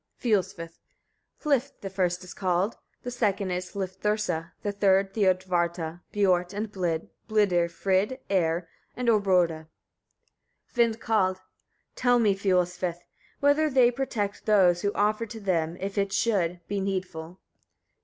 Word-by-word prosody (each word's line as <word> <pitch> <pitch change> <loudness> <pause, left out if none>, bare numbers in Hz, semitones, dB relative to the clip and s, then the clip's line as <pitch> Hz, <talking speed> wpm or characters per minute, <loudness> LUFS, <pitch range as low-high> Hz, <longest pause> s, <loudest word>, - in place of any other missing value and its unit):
Fiolsvith. 190 -7 -1 0.6
39. - - -26
Hlif 280 -3 +1
the 195 - -5
first 180 -1 0
is 180 - -9
called, 185 +3 0 0.3
the 245 - -4
second 205 -5 0
is 180 0 -4
Hlifthursa, 190 -3 -2
the 205 - 0
third 195 -1 +2
Thiodvarta, 175 -4 0
Biort 185 -3 +2
and 210 0 -3
Blid, 175 -5 -2 0.2
Blidr, 190 -6 +3
Frid, 195 +7 0
Eir 175 -3 +1 0.3
and 250 -1 0
Orboda. 180 -7 +2 1.1
Vindkald. 225 -5 +2
40. 185 - -30 0.5
Tell 245 -1 +3
me, 215 -4 +3
Fiolsvith! 180 -2 0
etc., 175 0 -8 0.3
whether 290 +2 +4
they 255 -3 +5
protect 230 -6 -3
those 185 -5 +4
who 205 - +1
offer 215 +2 +1
to 225 +1 -8
them, 170 -4 -1
if 195 +2 -3
it 200 0 0
should, 180 -6 0
be 200 0 -2
needful? 185 -3 -4
195 Hz, 135 wpm, -27 LUFS, 180-215 Hz, 1.1 s, they